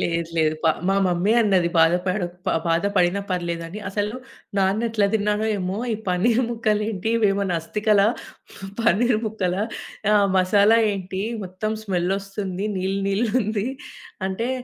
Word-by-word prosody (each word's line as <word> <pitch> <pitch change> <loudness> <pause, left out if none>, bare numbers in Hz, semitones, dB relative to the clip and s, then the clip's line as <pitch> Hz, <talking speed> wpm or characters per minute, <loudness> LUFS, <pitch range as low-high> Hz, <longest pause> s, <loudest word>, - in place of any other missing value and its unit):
లేదు, 170 -1 -1
లేదు. 155 -1 +2
ప - - +4 0.2
మా 195 - +3
మమ్మీ 180 +4 +1
అన్నది, 190 -5 +3
"బాధ 165 +1 +5
పడక్ 180 -2 -1
ప - - +2 0.2
బాధ 165 +2 +2
పడినా 180 +2 +3
పర్లేదు" 170 -2 -2
అని. 205 +5 -7
అసలు 205 +3 -2 0.4
నాన్న 195 +4 +2
ఎట్లా 215 -3 +2
తిన్నాడో 210 +1 +1
ఏమో! 185 +2 -3
"ఈ - - +1
పనీర్ 225 +7 +2
ముక్కలు 215 -2 0
ఏంటి, 215 0 -3
ఇవేమనా 200 -4 +1
అస్తికలా, 210 +3 +2 0.7
పనీర్ 230 0 +3
ముక్కలా 200 -3 -1 0.5
ఆహ్, 205 -1 +5
మసాలా 200 +4 +4 0.2
ఏంటి, 190 0 -4 0.2
మొత్తం 185 +4 -3
స్మెల్లొస్తుంది. 195 +1 -2
నీళ్లు, 190 +1 -1
నీళ్లుంది" 215 0 0 0.6
అంటే, 225 +6 -2
195 Hz, 140 wpm, -23 LUFS, 180-215 Hz, 0.7 s, బాధ